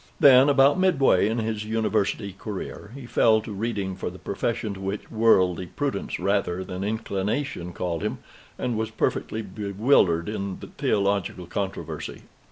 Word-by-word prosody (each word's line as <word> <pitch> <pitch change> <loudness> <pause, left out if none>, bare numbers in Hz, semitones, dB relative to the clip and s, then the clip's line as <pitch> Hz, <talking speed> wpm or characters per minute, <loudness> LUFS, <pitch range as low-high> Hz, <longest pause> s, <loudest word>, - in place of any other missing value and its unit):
Then, 135 0 +8
about 140 +3 +5
midway 135 - +4
in 115 - -1
his 110 -2 -2
University 105 -2 -1
career, 100 +1 -7
he 140 -3 -8
fell 110 -2 +4
to 110 - -8
reading 100 -3 -2
for 95 - -4
the 90 - -11
profession 105 +2 -2
to 95 - -9
which 95 +2 -5
worldly 95 -6 +3
prudence 135 0 -3
rather 100 -2 0
than 95 0 -5
inclination 105 -1 -2
called 85 -2 -3
him, - - -2 0.4
and 120 - -2
was 110 0 -1
perfectly 110 0 -1
bewildered 100 -3 +2
in 100 -3 -3
theological 100 -3 -1
controversy. 95 +2 -5
105 Hz, 145 wpm, -25 LUFS, 95-115 Hz, 0.4 s, Then